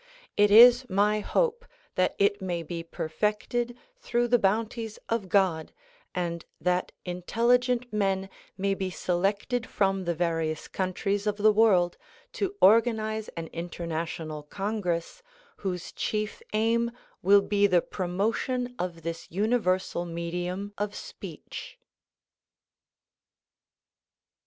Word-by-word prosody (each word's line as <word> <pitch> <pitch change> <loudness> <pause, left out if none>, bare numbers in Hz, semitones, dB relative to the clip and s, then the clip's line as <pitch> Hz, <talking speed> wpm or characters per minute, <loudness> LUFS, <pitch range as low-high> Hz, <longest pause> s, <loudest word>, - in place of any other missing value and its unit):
It 205 0 +5
is 245 +4 +8
my 205 +2 +2
hope 475 - 0 0.3
that 185 0 +1
it 200 0 +2
may 175 -3 -2
be 170 +1 -5
perfected 210 +9 -2 0.2
through 240 - 0
the 245 0 +5
bounties 220 +2 0
of 225 -5 -1
God 180 -5 +2 0.4
and 170 -2 -2 0.2
that 180 +1 0
intelligent 240 +7 +1
men 195 -2 0 0.3
may 195 +1 +1
be 190 -1 -2
selected 200 +7 -1
from 195 -2 +1
the 170 0 0
various 165 -2 -1
countries 195 +2 -1
of 210 -1 0
the 215 +1 +5
world 195 -5 +4 0.3
to 400 -5 -2
organize 220 0 +4
an 165 - -3
international 165 -2 -4
congress 195 - -3 0.4
whose 180 -3 -4
chief 215 0 -3
aim 230 +2 +2 0.3
will 200 +2 +6
be 205 0 +3
the 180 -3 +3
promotion 225 +7 -1
of 175 -2 -4
this 165 0 -5
universal 190 -3 0
medium 175 +4 -4
of 205 0 -2
speech. - - -9
200 Hz, 115 wpm, -28 LUFS, 175-220 Hz, 0.4 s, is